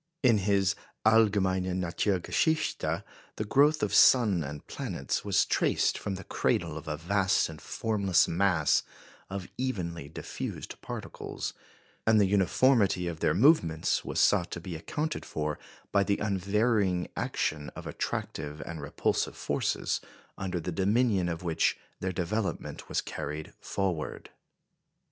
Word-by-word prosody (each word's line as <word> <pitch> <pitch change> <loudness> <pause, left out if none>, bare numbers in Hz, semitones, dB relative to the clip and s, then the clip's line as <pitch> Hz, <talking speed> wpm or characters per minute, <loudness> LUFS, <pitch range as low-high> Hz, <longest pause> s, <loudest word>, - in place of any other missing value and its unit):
In 115 -5 +5
his 100 -1 +2 0.3
Allgemeine 95 -4 +3
Naturgeschichte 95 - 0 0.3
the 110 - -3
growth 145 +7 +4
of - - 0
sun 105 -10 +6
and 75 +1 -7
planets 70 - -3
was - - +3
traced - - +2
from 100 -2 -3
the 95 - -7
cradle 85 -3 0
of 75 - -8
a 75 -1 -2
vast 95 +3 +2
and 80 -2 -10
formless 100 -4 +1
mass 85 -4 +3 0.5
of 95 -2 -5
evenly 85 - -3
diffused - - -6
particles, - - -6 0.5
and 110 -1 +6
the 100 - +5
uniformity 100 0 +3
of 85 -2 -4
their 75 - +2
movements 90 - +3
was - - -2
sought - - +4
to - - -5
be 90 -3 -6
accounted 150 - -3
for 75 -1 -3 0.3
by 100 -1 +4
the 100 0 +1
unvarying 100 -1 +1
action 75 -1 -2
of - - -8
attractive 75 0 -4
and 85 -2 -6
repulsive 75 - -1
forces, - - -1 0.3
under 95 -2 -3
the 85 +2 -4
dominion 100 +1 +2
of 85 +1 -4
which 85 -2 +1 0.2
their 95 - -2
development 95 +1 -3
was - - 0
carried 75 +2 -6
forward. 90 -6 -3
95 Hz, 135 wpm, -29 LUFS, 85-105 Hz, 0.5 s, sun